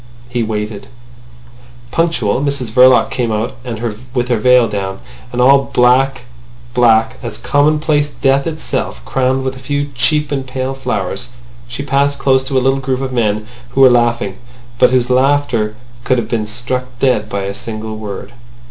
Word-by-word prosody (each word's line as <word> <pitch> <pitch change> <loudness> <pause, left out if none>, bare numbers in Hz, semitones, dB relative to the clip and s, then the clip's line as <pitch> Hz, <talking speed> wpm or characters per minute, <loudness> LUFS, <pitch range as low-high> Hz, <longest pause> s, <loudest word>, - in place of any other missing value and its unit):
He 120 -1 -1
waited. 105 -2 -4 1.0
Punctual, 135 -9 0
Mrs 140 -5 -2
Verloc 125 +2 +5
came 120 -3 -1
out, 110 +3 -2 0.6
with 125 0 0
her 120 -3 +1
veil 125 +1 +5
down, 95 -2 -4 0.3
and 125 - -4
all 135 +2 +5
black—black 120 -2 +1
as 115 -3 -5
commonplace 145 +3 +1
death 135 0 +1
itself, 155 - -3
crowned 130 0 0
with 130 0 -3
a - - -10
few 145 +2 -2
cheap 150 +4 +1
and 135 -2 -2
pale 130 +1 -3
flowers. 120 -4 -3 0.4
She 120 +4 -5
passed 140 +1 +1
close 135 -1 +2
to 135 0 -1
a 130 - +1
little 135 +1 +2
group 135 -1 -2
of 130 -1 -3
men 110 -3 0 0.3
who 135 - +3
were 130 -1 +8
laughing, 120 -5 +1 0.4
but - - +6
whose 125 -1 +1
laughter 125 -5 +1 0.3
could 130 - +1
have 115 -2 -2
been 110 -3 -1
struck 125 +3 -3
dead 120 -5 +1
by 100 -2 -3
a 100 +1 -3
single 110 0 -6
word. 105 +1 -7
125 Hz, 160 wpm, -16 LUFS, 110-135 Hz, 1.0 s, were